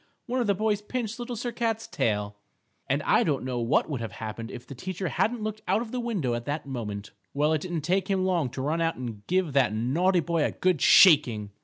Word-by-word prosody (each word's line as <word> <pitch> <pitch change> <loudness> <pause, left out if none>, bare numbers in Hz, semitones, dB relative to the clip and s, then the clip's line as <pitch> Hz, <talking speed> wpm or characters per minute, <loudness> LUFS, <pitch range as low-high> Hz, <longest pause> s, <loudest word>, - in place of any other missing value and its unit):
One 250 0 -1
of 235 - -1
the 200 - +3
boys 210 0 0
pinched 225 +1 -4
Little 240 0 -4
Sir 240 +2 -3
Cat's 225 -1 -1
tail. 105 -1 -1 0.5
And - - +1
I - - +4
don't 145 -4 0
know 125 -2 -2
what 120 +3 +2
would 140 -6 -3
have 115 - -5
happened 115 +1 -6
if 125 -1 -9
the - - -9
teacher 185 +6 -4
hadn't 225 -1 0
looked 215 0 -4
out 225 - +2
of 225 - -10
the 255 - -2
window 200 - -1
at 120 0 -3
that 145 +1 -3
moment. 105 -6 -5 0.2
Well, 150 +2 +2
it 155 - 0
didn't 175 -2 -3
take 185 +4 0
him 190 -1 +1
long 175 -8 +1
to 130 +2 -5
run 160 +4 0
out 165 0 +1
and 115 -5 -6
give 180 -5 +1
that 130 -6 +3
naughty 170 - +2
boy 165 0 0
a - - 0
good 180 -5 +1
shaking. 125 - +6
165 Hz, 235 wpm, -27 LUFS, 125-205 Hz, 0.5 s, shaking